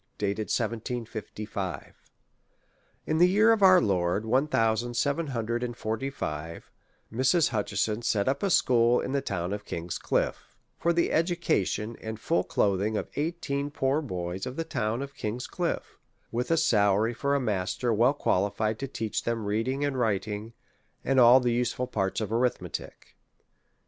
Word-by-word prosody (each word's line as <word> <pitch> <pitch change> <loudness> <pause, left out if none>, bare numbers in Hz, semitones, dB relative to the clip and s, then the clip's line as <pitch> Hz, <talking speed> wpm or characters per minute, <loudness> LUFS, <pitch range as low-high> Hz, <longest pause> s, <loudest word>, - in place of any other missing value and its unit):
Dated 105 +1 -2
1755. 110 -4 -4 1.1
In 155 +1 0
the 180 +1 +6
year 215 +4 +5
of 220 - -1
our 185 -1 +8
Lord, 95 - 0
one 130 +6 +2
thousand 115 -2 +1
seven 140 +6 0
hundred 120 -2 -2
and 120 -1 -4
forty 110 +5 -2
five, 80 - -6 0.4
Mrs. 135 +8 +3
Hutcheson 105 0 -1
set 105 -3 0
up 135 +1 0
a 200 - +1
school 120 -7 +4
in - - -3
the 140 0 0
town 90 -3 -3
of 105 0 -5
King's 85 -3 -5
Cliffe, - - -2 0.2
for 170 - +2
the 170 0 +1
education 160 - 0
and 110 0 -6
full 165 +9 +1
cloth 100 -2 +1
ing 105 +1 0
of - - -4
eighteen 145 -2 -2
poor 140 +1 0
boys 90 - -4
of 130 - -6
the 165 - -2
town 120 -5 -2
of 140 0 -8
King's 120 -1 -4
Cliffe, - - -3 0.3
with 120 +2 -2
a 165 - +3
salary 110 -6 +3
for 140 +4 0
a - - +2
master 110 +1 -1
well 120 +6 +3
qualified 105 -1 0
to 135 - -3
teach 110 -4 -3
them 115 -2 -2
reading 120 +7 0
and 135 -2 -2
writing, 105 0 -1 0.5
and 135 -1 +3
all 125 +1 +8
the 120 -2 +1
useful 125 +1 0
parts 95 -6 -1
of 110 - -3
arith 120 +2 +1
metic. - - -8
115 Hz, 165 wpm, -28 LUFS, 105-140 Hz, 1.1 s, our